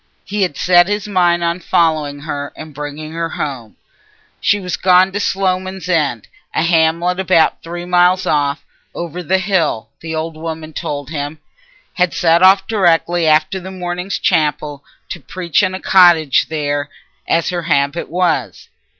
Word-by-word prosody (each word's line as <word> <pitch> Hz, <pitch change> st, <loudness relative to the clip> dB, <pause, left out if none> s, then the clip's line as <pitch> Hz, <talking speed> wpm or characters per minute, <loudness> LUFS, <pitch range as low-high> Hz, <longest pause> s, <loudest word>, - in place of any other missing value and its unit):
He 205 Hz, 0 st, -3 dB
had 180 Hz, -7 st, -1 dB
set 175 Hz, 0 st, +4 dB
his 205 Hz, 0 st, -2 dB
mind 175 Hz, -3 st, +2 dB
on 170 Hz, +1 st, -1 dB
following 155 Hz, -5 st, 0 dB
her 145 Hz, -2 st, -5 dB
and 155 Hz, -1 st, -9 dB
bringing 150 Hz, +2 st, -7 dB
her 165 Hz, 0 st, -3 dB
home. 130 Hz, -9 st, -5 dB, 0.6 s
She 205 Hz, -, +2 dB
was 180 Hz, -3 st, -3 dB
gone 185 Hz, +1 st, +4 dB
to 205 Hz, -, -3 dB
Sloman's 190 Hz, -2 st, -2 dB
End, 150 Hz, -, 0 dB, 0.3 s
a -, -, +1 dB
hamlet 170 Hz, +2 st, +2 dB
about 185 Hz, -4 st, +2 dB
three 175 Hz, +1 st, -7 dB
miles 180 Hz, +1 st, +3 dB
off, 145 Hz, 0 st, 0 dB, 0.3 s
over 175 Hz, +1 st, -5 dB
the 185 Hz, +3 st, +1 dB
hill, 185 Hz, -, -1 dB
the 160 Hz, 0 st, -5 dB
old 160 Hz, 0 st, -4 dB
woman 160 Hz, 0 st, -7 dB
told 145 Hz, -1 st, -5 dB
him—had 155 Hz, +4 st, -5 dB
set 170 Hz, 0 st, +3 dB
off 190 Hz, +1 st, +6 dB
directly 175 Hz, -5 st, +1 dB
after 155 Hz, +4 st, +2 dB
morning 180 Hz, 0 st, -5 dB
chapel, 150 Hz, -5 st, 0 dB, 0.3 s
to 175 Hz, -, -6 dB
preach 170 Hz, +4 st, -1 dB
in 185 Hz, -1 st, 0 dB
a -, -, -5 dB
cottage 175 Hz, -8 st, +4 dB
there, 145 Hz, -2 st, -2 dB, 0.4 s
as 165 Hz, -, +1 dB
her 175 Hz, -1 st, -2 dB
habit 145 Hz, -1 st, 0 dB
was. 175 Hz, +1 st, -1 dB
170 Hz, 150 wpm, -17 LUFS, 155-185 Hz, 0.6 s, off